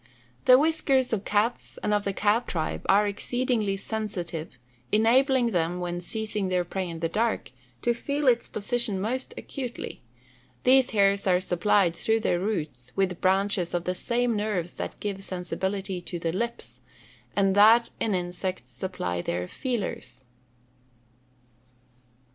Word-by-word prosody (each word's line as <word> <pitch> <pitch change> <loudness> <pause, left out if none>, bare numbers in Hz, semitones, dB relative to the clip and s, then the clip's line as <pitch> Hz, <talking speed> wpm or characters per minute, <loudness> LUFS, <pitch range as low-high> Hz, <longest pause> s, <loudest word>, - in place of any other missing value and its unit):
_ - - -34
The 255 - +9
whiskers 275 -4 +2
of 205 -2 -1
cats, 215 +4 0
and 210 - +1
of 205 -1 +1
the 200 - +1
cat 210 +5 +1
tribe, 160 -3 -2
are 205 +2 +5
exceedingly 220 -1 0
sensitive, 195 -6 -4 0.3
enabling 240 +3 +4
them, 175 -1 0
when 175 0 -3
seizing 210 +1 -2
their 180 -1 +1
prey 185 +1 -3
in 165 -1 -7
the 165 - +1
dark, 220 - -1 0.3
to 240 - +3
feel 280 +4 -2
its 240 -2 +3
position 215 -1 -1
most 250 +6 -3
acutely. 250 -4 -6 0.6
These 260 0 +5
hairs 200 -1 +3
are 180 -1 +4
supplied, 185 0 +2
through 225 +2 +1
their 175 - +1
roots, 150 - -3
with 185 -3 0
branches 190 -2 +1
of 175 - -1
the 180 - -1
same 235 +4 0
nerves 205 -5 -1
that - - -5
give 200 -2 -4
sensibility 190 0 -3
to 175 - -6
the 165 -1 -2
lips, 190 - -4 0.6
and 195 -1 +3
that 220 +4 +6
in 210 -3 +1
insects 175 -7 -4
_supply 90 - -3
their 90 +1 -2
"feelers." 165 - -4
200 Hz, 145 wpm, -27 LUFS, 180-230 Hz, 0.6 s, The